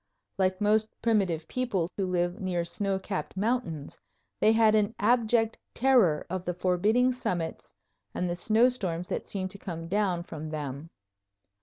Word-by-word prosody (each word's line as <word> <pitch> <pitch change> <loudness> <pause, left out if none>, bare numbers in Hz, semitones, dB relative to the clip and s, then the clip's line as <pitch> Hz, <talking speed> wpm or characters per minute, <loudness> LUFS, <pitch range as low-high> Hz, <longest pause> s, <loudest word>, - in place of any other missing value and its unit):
Like 185 0 +2
most 215 +1 +3 0.2
primitive 190 -8 +1
people 235 -10 -1
who 195 -2 -1
live 175 +1 0
near 180 -3 -1
snow 195 +2 -1
capped 190 -1 -5
mountains, 195 - -2 0.4
they 215 - +5
had 220 -1 +5
an 215 0 +2
abject 225 0 +2 0.2
terror 235 - +4
of 185 +1 -3
the 180 -1 -3
forbidding 205 +8 +2
summits 175 -10 -3 0.4
and 180 - -2
the 175 - -1
snowstorms 210 -4 +1
that - - -3
seem 190 -2 -2
to 200 +1 -10
come 165 -4 -6
down 185 -2 0
from 155 -2 -7
them. 150 0 -5
190 Hz, 150 wpm, -28 LUFS, 175-220 Hz, 0.4 s, they